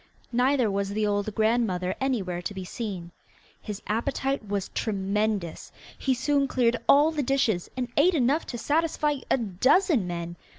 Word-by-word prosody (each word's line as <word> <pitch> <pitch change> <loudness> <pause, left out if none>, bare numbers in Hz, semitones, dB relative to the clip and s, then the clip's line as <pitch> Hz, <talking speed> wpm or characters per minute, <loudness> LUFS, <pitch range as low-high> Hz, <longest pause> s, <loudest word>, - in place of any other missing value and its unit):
Neither 250 -2 +2
was 200 0 -1
the 210 +1 0
old 205 0 -1
grandmother 215 -5 +1
anywhere 195 -10 -1
to 200 +3 -5
be 190 -1 -5
seen. 185 -5 -5 0.5
His 210 -1 -7
appetite 265 +2 -1
was 200 -1 -2
tremendous: 200 -3 -2 0.2
he 265 -2 0
soon 280 +2 +1
cleared 245 -2 +2
all 295 +3 +6
the 305 -2 -1
dishes, 245 -9 +1
and 250 -1 -1
ate 340 +5 +4
enough 280 +3 +1
to 240 - -5
satisfy 300 +2 0
a - - +4
dozen 245 - +2
men. 170 0 -5
225 Hz, 155 wpm, -26 LUFS, 195-270 Hz, 0.5 s, all